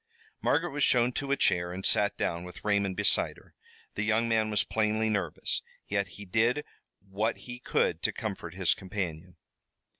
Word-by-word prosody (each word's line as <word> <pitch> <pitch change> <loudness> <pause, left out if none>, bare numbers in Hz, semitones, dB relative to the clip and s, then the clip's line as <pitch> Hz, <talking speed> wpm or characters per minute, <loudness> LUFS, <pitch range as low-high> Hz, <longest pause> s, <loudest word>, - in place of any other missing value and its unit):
Margaret - - +2
was 145 0 0
shown 125 0 +4
to 140 +2 -3
a 140 - +3
chair 85 0 +2
and 95 +1 -4
sat 100 0 +3
down, 85 +1 -1
with 90 +3 -11
Raymond 100 -2 +1
beside 105 -2 +2
her. - - -19 0.4
The - - -3
young 110 +2 +2
man 110 -1 +2
was 105 -1 +2
plainly 110 0 +1
nervous, 105 -2 -1 0.3
yet 100 0 0
he 105 - -8
did 115 +9 +2 0.4
what 105 +4 -1
he 125 0 -7
could - - +1
to - - +2
comfort 90 -5 -5
his 95 -2 +3
companion. 90 -3 -5
105 Hz, 175 wpm, -29 LUFS, 95-110 Hz, 0.4 s, shown